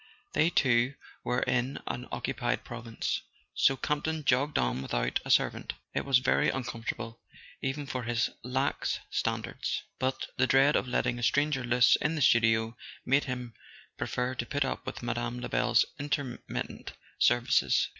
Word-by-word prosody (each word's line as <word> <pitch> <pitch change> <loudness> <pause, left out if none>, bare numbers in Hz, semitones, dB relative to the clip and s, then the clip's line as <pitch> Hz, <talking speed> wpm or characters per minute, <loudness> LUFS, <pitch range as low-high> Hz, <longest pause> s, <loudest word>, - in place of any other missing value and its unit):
They 160 +3 +4
too 130 -3 +3 0.3
were 125 +1 0
in 130 +2 0
an 125 +1 -4
occupied 120 -1 -2
province. 115 -2 -3 0.3
So 135 - +3
Campton 150 +2 -1
jogged 135 +4 +2
on 60 +1 0
without - - -1
a - - -8
servant. - - +2 0.2
It - - -1
was 135 -2 +5
very 130 +1 +2
uncomfortable, 115 -2 -4 0.4
even 135 +2 -2
for 130 -2 -3
his 120 0 0
lax 130 +3 -1
standards; - - -2 0.2
but 130 0 -1
the 130 - +3
dread 135 +3 +5
of - - +1
letting 120 -1 0
a - - -6
stranger 145 +2 +2
loose 120 +1 +5
in 160 +2 0
the 155 - -2
studio 115 -1 +4 0.3
made 135 +3 +3
him 125 -3 -5 0.4
prefer 125 +1 -2
to 120 -1 -3
put 145 -2 0
up 135 - -4
with - - -5
Mme. 120 0 -2
LebeFs 125 - +2
intermittent 145 -3 -4 0.3
services. 120 0 +3
125 Hz, 150 wpm, -30 LUFS, 120-135 Hz, 0.4 s, was